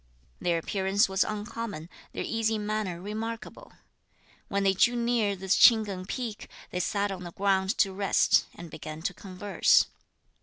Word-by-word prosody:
Their 170 -1 +1
appearance 195 +5 +1
was 190 0 +2
uncommon, 210 -5 -5 0.2
their - - -4
easy 225 -1 0
manner 210 -4 -2
remarkable. 225 - -6 0.8
When 200 0 -1
they 195 -1 +4
drew 240 +6 +3
near 235 -4 +1
this 190 0 0
Ch'ing 225 -3 +7
Keng 185 -2 -6
peak, 230 -2 -5 0.2
they 180 - -2
sat 200 +2 0
on 190 -2 -6
the 175 -1 -8
ground 195 +1 +1
to 195 -2 +2
rest, 195 -1 +3
and 170 -2 -10
began 155 0 -8
to 180 - -1
converse. 190 0 +2
200 Hz, 155 wpm, -28 LUFS, 185-220 Hz, 0.8 s, Ch'ing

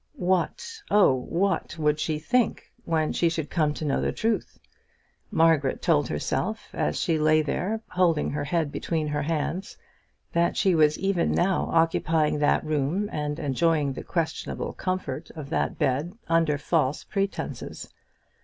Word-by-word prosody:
What, 190 - -1
oh, 205 -9 +5
what 170 +8 -1
would 150 -1 +1
she 155 0 -1
think 235 +10 0
when 160 -2 0
she 170 - +2
should 160 -2 -4
come 155 -3 +2
to 155 - -4
know 140 - +1
the - - 0
truth? 225 0 -2 0.7
Margaret 160 -8 +3
told 150 -6 +2
herself 75 - -2
as 75 - -1
she 160 -2 +1
lay 155 0 +4
there, 210 +9 -2
holding 170 -4 +1
her 145 0 -2
head 160 -1 0
between 155 -1 -2
her 150 0 -1
hands, 165 +5 -2 0.6
that 170 0 +2
she 190 -2 +3
was 155 -2 +4
even 195 -3 +1
now 185 +2 +1
occupying 165 -2 +2
that 145 +1 +2
room 155 +7 0
and 150 -1 -2
enjoying 150 0 +1
the - - -7
questionable 165 -2 -3
comfort 175 -5 -3
of 150 -2 -8
that - - 0
bed 145 +7 0
under 165 -3 +2
false 145 -1 0
pretences. 195 0 -4
160 Hz, 150 wpm, -26 LUFS, 150-175 Hz, 0.7 s, oh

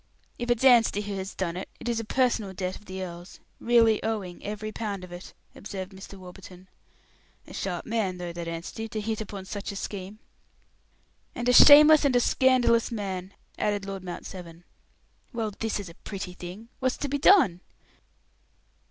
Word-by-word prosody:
"If 240 0 -4
it's 240 +1 +1
Anstey 235 -5 +5
who 205 -1 -5
has 190 +1 -6
done 175 -3 -2
it 185 - -6
it - - -8
is 235 -1 0
a - - -3
personal 230 -4 0
debt 185 0 -3
of 210 - -14
the 190 -1 -5
earl's, 175 +1 -9 0.2
really 230 -2 +4
owing, 205 -6 -3
every 210 +1 -5
pound 205 -4 -4
of 180 - -10
it," 175 +1 -10 0.2
observed 190 -1 -7
Mr. 195 +1 -11
Warburton. 185 0 -13 0.8
"A - - -13
sharp 180 -3 -4
man, 215 -5 -1
though, 175 -1 -6
that 170 0 -6
Anstey, 170 +7 -5
to 215 0 -4
hit 220 +1 -3
upon 200 -2 -7
such 200 +1 -5
a - - -8
scheme." 195 +1 -6 1.2
"And 240 - -3
a 250 - +4
shameless 300 +3 +9
and 275 -3 +2
a - - +6
scandalous 245 -2 +3
man," 195 -3 -5 0.2
added 205 -1 0
Lord 195 -1 -6
Mount 180 -1 -7
Severn. 175 -2 -10 0.7
"Well, 225 -3 -2
this 225 -2 -1
is 200 - -7
a 170 - -11
pretty 190 0 -7
thing. 180 +6 -9
What's 255 -1 0
to 285 - -3
be 285 +1 -2
done?" 275 - +5
205 Hz, 180 wpm, -27 LUFS, 185-230 Hz, 1.2 s, shameless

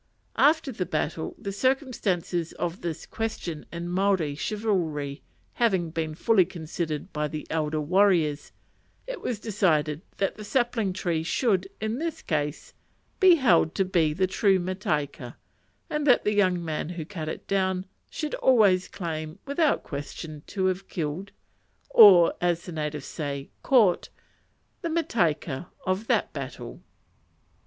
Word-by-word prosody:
After 305 -1 +4
the 185 -7 -3
battle 160 -1 -2
the 200 - -5
circumstances 200 - -1
of 175 +2 -4
this 170 -3 -4
question 215 -8 -4
in 170 +1 -5
Maori 185 -4 +1
chivalry 160 -7 -2 0.3
having 190 -8 +1
been 160 -1 -3
fully 205 +2 +4
considered 160 -3 -5
by 150 0 -1
the 150 +1 -6
elder 155 -1 0
warriors, 165 -3 +2 0.5
it - - -6
was 235 -5 -3
decided 160 -8 +1 0.2
that 195 - -1
the 215 - -7
sapling 235 -3 0
tree 170 -3 -1
should, 190 - +1
in 220 +4 -2
this 330 -1 -4
case, 150 -2 -2 0.5
be 370 -3 +8
held 180 - +3
to 195 - +2
be 170 -4 +2
the 185 +5 +1
true 190 +1 +3
mataika, 155 -9 -3 0.5
and 300 -1 -2
that 250 - +5
the 210 - +1
young 185 -4 +2
man 155 0 -3
who 170 -3 -5
cut 160 -4 -5
it - - -6
down 190 -1 0 0.2
should 305 -2 -4
always 205 -8 +4
claim, 155 -2 -5
without 285 +2 +1
question, 145 +1 -7
to 190 -2 -2
have 185 +1 -1
killed, 170 +5 -4 0.6
or, 190 -6 +8
as 175 -1 0
the 180 - -7
natives 150 -3 -4
say, 140 -3 -5
"caught," 220 -10 +3 0.7
the 340 - -2
mataika 175 - 0 0.2
of 185 +4 -1
that - - +1
battle. - - -7
180 Hz, 140 wpm, -26 LUFS, 155-210 Hz, 0.7 s, be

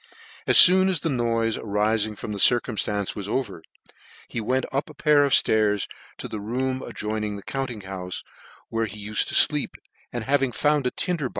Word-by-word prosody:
As - - +7
foon 185 +1 +8
as 180 -5 -1
the 165 - -2
noife 115 -3 -1
arising 105 +1 -1
from 105 - -7
this 100 -2 +1
circuin 120 -1 +2
flance 100 0 -2
was 100 -1 -6
over, 110 -9 -3 0.7
he 115 - -4
went 130 +4 -1
up 135 +3 -3
one 155 - -13
pair 150 0 +3
of 140 - -2
ftairs 105 -4 +2 0.3
to - - -6
a - - -4
room 130 +5 -3
adjoining 105 -1 -4
the 100 - -9
cbmpting 130 -6 -5
houfe, 95 -1 -6 0.5
where 115 0 -2
he. 105 +1 -9
ufed 105 0 +1
to - - -2
fleep, - - +3 0.4
and 120 -2 -5
having 135 0 0
found 145 +1 +1
a - - -1
tindor. 165 -8 -3
115 Hz, 190 wpm, -24 LUFS, 105-135 Hz, 0.7 s, foon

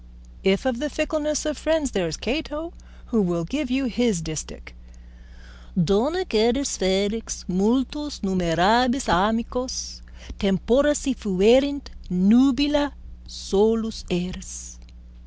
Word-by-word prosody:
If 195 +4 +2
of 255 -2 -1
the 300 +1 -2
fickleness 300 0 -2
of 300 -3 -3
friends, 310 -4 0
there 190 -5 -1
is 160 - -5
Cato, 305 +6 -4 0.4
who 225 - +4
will 175 -3 -1
give 275 - -3
you 265 +1 0
his 230 -4 0
distich: 155 - -7 1.1
_Donec 235 - +1
eris 240 +6 +2
felix 200 +4 -1
multos 255 +10 -1
numerabis 195 +7 +2
amicos, 215 - -1 0.4
Tempora 235 - +2
si 275 -2 -1
fuerint 245 +8 +2 0.2
nubila, 270 +9 +3 0.3
solus 220 - 0
eris. 175 - -6
225 Hz, 105 wpm, -23 LUFS, 190-275 Hz, 1.1 s, who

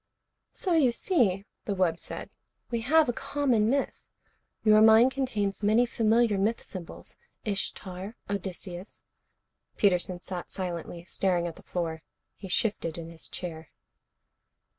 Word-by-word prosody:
"So 365 - -1
you 290 -7 +5
see," 225 - +1 0.2
the 200 - -1
wub 175 -3 +1
said, - - -7 0.4
"we 235 -1 0
have 310 +6 +4
a 245 - +1
common 245 -5 +1
myth. 275 +2 -1 0.5
Your 215 -1 +6
mind 220 +3 +7
contains 215 -8 -1
many 215 +4 +4
familiar 225 -2 +2
myth 220 +4 +1
symbols. 180 -4 -9 0.3
Ishtar, 195 0 -3
Odysseus 190 -1 -5 0.4
" - - -47
Peterson 180 -2 +2
sat 180 0 -6
silently, 175 -2 -5
staring 180 -2 +1
at 170 -2 -4
the - - -14
floor. 165 -3 -3 0.3
He 195 - -9
shifted 180 -4 0
in 165 0 -7
his 165 -1 -9
chair. 160 -3 -6
200 Hz, 135 wpm, -28 LUFS, 180-230 Hz, 0.5 s, mind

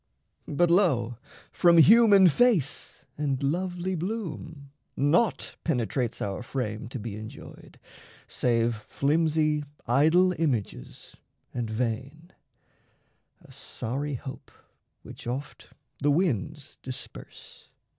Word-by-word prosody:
But, 170 +3 +2
lo, 130 - +2 0.3
from 170 -1 +4
human 200 +2 +7
face 185 - +1
and 140 -2 -1
lovely 180 +4 -1
bloom 165 -6 -5 0.3
Naught 165 - +1
penetrates 125 -4 -1
our 100 +2 -3
frame 115 -3 -4
to 130 - -6
be 110 -2 -6
enjoyed 110 0 -11 0.5
Save 115 -2 0
flimsy 150 +5 0 0.2
idol 160 +9 +4
images 120 - -3 0.4
and 120 -2 -3
vain 125 +9 -4 1.1
A - - -18
sorry 140 +5 -5
hope 130 +1 -9 0.5
which - - -11
oft 130 +4 -6 0.3
the 145 - +1
winds 145 - -1
disperse. 130 -1 -11
145 Hz, 95 wpm, -27 LUFS, 120-170 Hz, 1.1 s, human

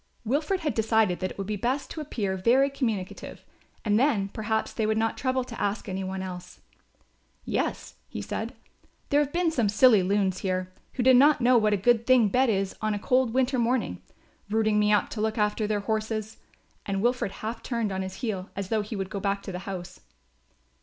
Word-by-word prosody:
Wilfred 305 - 0
had 300 -3 -1
decided 220 -4 +2
that 185 - -2
it - - -11
would 195 - -3
be 210 +2 -2
best 255 +7 -2
to 315 - -5
appear 210 -10 -2
very 250 +9 +3
communicative 220 -9 -4 0.4
and 210 0 +3
then 225 -8 +2
perhaps 220 +1 -2
they 220 - 0
would 215 0 +1
not 225 0 0
trouble 260 -1 0
to 240 -2 -8
ask 205 +1 -1
any 190 0 -3
one 190 0 -4
else. 180 -1 -8 0.9
"Yes," - - -2 0.2
he - - -6
said, - - -4 0.5
"there 285 - +4
have 290 -1 0
been 345 0 +1
some 240 -9 +1
silly 215 0 +6
loons 190 0 +1
here, 185 -1 -2 0.2
who 250 - -1
did 260 0 +7
not 290 +2 +6
know 250 +1 +4
what 215 -2 +4
a 205 - +3
good 230 +3 +2
thing 250 -5 +5
bed 255 +4 +3
is 195 -2 0
on 215 -1 0
a - - -2
cold 250 +3 +2
winter 260 0 +2
morning, 240 +1 0 0.5
routing 215 0 +2
me 210 0 +3
up 210 - +3
to 215 - -4
look 220 +1 -1
after 210 0 +1
their 210 -1 0
horses," 215 +1 -2 0.5
and 195 0 -2
Wilfred 240 -5 0
half 225 +1 -4
turned 230 -4 -2
on 190 0 -2
his 190 0 -6
heel 195 -4 -3
as 195 -1 -4
though 220 -1 +1
he 215 +2 -6
would 195 -1 -4
go 200 - -3
back 200 0 -1
to - - -6
the 180 - -5
house. 180 -1 -7
215 Hz, 210 wpm, -27 LUFS, 195-245 Hz, 0.9 s, did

